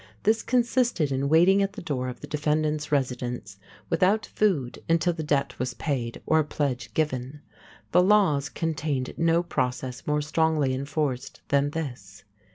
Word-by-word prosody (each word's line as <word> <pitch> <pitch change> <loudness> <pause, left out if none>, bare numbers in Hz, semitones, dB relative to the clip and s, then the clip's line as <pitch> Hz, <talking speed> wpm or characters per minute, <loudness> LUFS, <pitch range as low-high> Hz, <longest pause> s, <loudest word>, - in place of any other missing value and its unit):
This 220 +1 +3
consisted 240 - +1
in 135 +1 0
waiting 175 +5 +5
at 195 0 0
the 210 - -7
door 130 -5 -2
of 125 - -9
the - - -6
defendant's 150 0 -1
residence 125 -7 -2 0.3
without 205 +3 +2
food 160 - 0
until 165 +1 +3
the 160 - -5
debt 140 -3 -1
was 125 -1 -2
paid 120 -5 -3
or 160 - +3
a - - +3
pledge 130 -7 -2
given. 145 -2 -2 0.5
The 180 - +6
laws 185 -8 +3
contained 155 -5 -2
no 165 +1 +2
process 125 -5 -3
more 150 0 +1
strongly 155 -3 +1
enforced 140 -1 -3
than 140 0 +3
this. 125 -11 -6
150 Hz, 155 wpm, -26 LUFS, 130-165 Hz, 0.5 s, The